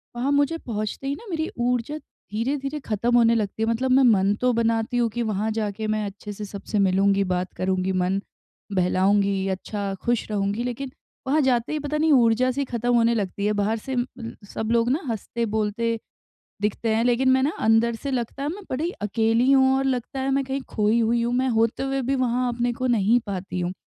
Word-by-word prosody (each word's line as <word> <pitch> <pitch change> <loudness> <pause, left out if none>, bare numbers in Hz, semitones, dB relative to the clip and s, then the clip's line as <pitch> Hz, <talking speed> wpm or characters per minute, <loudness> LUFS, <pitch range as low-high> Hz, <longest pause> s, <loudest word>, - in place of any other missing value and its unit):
वहाँ 255 +4 0
मुझे 285 +3 +2
पहुँचते 215 +1 -4
ही 280 - -1
ना 460 - -13
मेरी 320 -2 -2
ऊर्जा 245 +4 0
धीरे-धीरे 275 +3 -4
खत्म 235 +3 0
होने 230 0 +5
लगती 215 0 -1
है। 225 - +1
मतलब 255 +3 0
मैं 265 +1 +5
मन 195 -1 +3
तो 250 -1 +3
बनाती 230 +1 0
हूँ 235 -1 +2
कि 240 +2 -3
वहाँ 215 0 -1
जाके 215 0 -2
मैं 215 -1 0
अच्छे 205 +1 -7
से 210 +1 -6
सबसे 205 +1 -4
मिलूँगी, 195 +1 +3
बात 180 -1 -2
करूँगी, 185 0 0
मन 185 +1 0 0.5
बहलाऊँगी, 195 +1 +2
अच्छा 195 +1 -3
खुश 240 -2 0
रहूँगी 205 +2 -1
लेकिन, 250 +2 -4 0.4
वहाँ 300 +3 +3
जाते 250 0 +1
ही 305 - -1
पता 295 +1 -2
नहीं 315 +1 +2
ऊर्जा 245 0 +4
सी 280 +2 -2
खत्म 245 -1 -1
होने 235 0 +4
लगती 200 -1 -2
है, 210 - +1
बाहर 210 +2 0
से 260 +4 -5
उम 245 - +1
उम, 230 -1 -6 0.2
सब 220 0 -2
लोग 235 0 +3
ना 295 +6 0
हँसते-बोलते 225 0 -2 0.6
दिखते 220 +2 0
हैं, 225 +1 +2
लेकिन 250 +2 +3
मैं 260 0 +4
ना 280 - +2
अंदर 225 +1 +3
से 280 +5 -5
लगता 255 +1 -3
है, 285 - -1
मैं 400 +5 -7
बड़ी 310 +7 -1
अकेली 225 +4 +2
हूँ 265 0 +5
और 270 - 0
लगता 260 0 -2
है 270 - 0
मैं 275 0 +1
कहीं 270 +1 -3
खोई 215 +2 +2
हुई 235 +1 +2
हूँ, 240 +1 0
मैं 260 +1 +1
होते 230 +1 +1
हुए 270 0 -1
भी 270 +3 0
वहाँ 250 0 +1
अपने 240 +1 0
को 255 +2 -3
नहीं 230 -1 +3
पाती 185 -2 -4
हूँ। 175 +1 -2
230 Hz, 210 wpm, -24 LUFS, 210-260 Hz, 0.6 s, होने